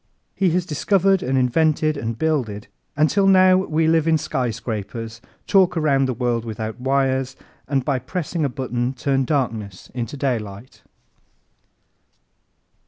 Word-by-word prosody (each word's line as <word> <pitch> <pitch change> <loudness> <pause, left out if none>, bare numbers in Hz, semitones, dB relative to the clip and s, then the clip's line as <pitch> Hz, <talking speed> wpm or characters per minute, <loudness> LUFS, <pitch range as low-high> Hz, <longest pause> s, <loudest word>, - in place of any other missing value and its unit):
He 190 -2 +2
has 175 +1 0
discovered 195 +5 +2
and 130 +1 0
invented 155 +4 +2
and 115 -5 -4
builded 120 -9 -1 0.3
until 195 +6 +3
now 185 -1 +6
we 160 -4 0
live 160 0 +3
in 160 -1 +4
skyscrapers, 115 -5 -4 0.2
talk 185 -3 +3
around 140 -4 +2
the 130 - -2
world 120 -2 -1
without 110 +1 -5
wires 135 -1 0 0.3
and 135 -2 0
by 140 -3 0
pressing 160 +5 -3
a 140 - +1
button 125 0 -3
turn 135 +1 0
darkness 110 -9 -3
into 120 +2 -4
daylight. 115 -4 -4
135 Hz, 130 wpm, -21 LUFS, 120-160 Hz, 0.3 s, now